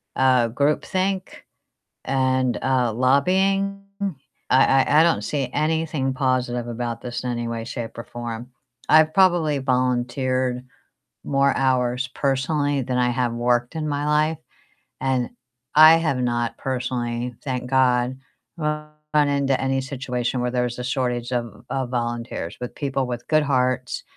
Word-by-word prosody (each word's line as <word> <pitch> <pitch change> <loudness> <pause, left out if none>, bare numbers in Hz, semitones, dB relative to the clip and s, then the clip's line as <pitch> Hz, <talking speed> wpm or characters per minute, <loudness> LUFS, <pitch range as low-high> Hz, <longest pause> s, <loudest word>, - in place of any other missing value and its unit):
uh, 130 -3 +4
groupthink, 185 +9 -1 0.6
and, 130 -1 +1
uh, 125 -4 +1
lobbying. 190 - +2 0.7
I 130 - +6 0.2
I 150 - +4
I - - +6
don't 170 - +2
see 140 -4 -2
anything 155 -3 0
positive 125 -2 0
about 120 0 -4
this 120 0 -5
in 125 - -2
any 120 0 -3
way, 115 -1 -4
shape, 120 -2 -6
or 115 - -5
form. 120 +1 -7 0.4
I've 155 0 +6
probably 175 -6 +3
volunteered 125 0 0 0.6
more 140 -1 +2
hours 130 -1 +1
personally 140 +1 0
than 125 0 -2
I 125 0 +2
have 120 -1 0
worked 120 +3 0
in 155 -1 -2
my 145 0 -2
life, 150 +1 +2 0.6
and 130 -2 0 0.5
I 155 +1 +9
have 155 -6 0
not 120 -1 -1
personally, 125 -2 -3
thank 125 -3 -3
god, 130 -1 +2 0.4
run 150 -1 -2 0.4
into 140 -2 +1
any 135 0 0
situation 125 -2 -3
where 125 0 -1
there's 125 -1 -1
a 125 - -3
shortage 125 -1 -2
of 120 -2 -4
of 130 -2 -2
volunteers 120 -7 -3
with 125 - -6
people 135 -2 -2
with 120 -1 -5
good 155 -1 +4
hearts 130 -2 0
130 Hz, 140 wpm, -23 LUFS, 125-145 Hz, 0.7 s, I